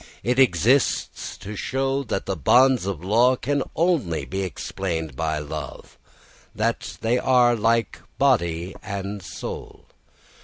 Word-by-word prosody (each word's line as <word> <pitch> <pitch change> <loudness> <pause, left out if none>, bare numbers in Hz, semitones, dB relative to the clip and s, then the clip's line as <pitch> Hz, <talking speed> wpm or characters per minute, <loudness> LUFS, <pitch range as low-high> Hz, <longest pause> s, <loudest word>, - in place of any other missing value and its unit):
It 125 +2 +1
exists 125 - +2
to 105 +2 -8
show 135 +5 -1
that 95 - -3
the 95 - -2
bonds 125 - +4
of 90 -4 -4
law 120 +6 +4
can 140 +3 -1
only 155 - +1
be 95 +1 -3
explained 85 -5 -4
by 80 +1 -1
love; 75 0 -7 0.6
they 115 +2 -1
are 125 -2 +4
like 115 +1 +1 0.2
body 90 -10 +1
and 100 +1 -5
soul. 90 - -8
105 Hz, 120 wpm, -23 LUFS, 90-130 Hz, 0.6 s, bonds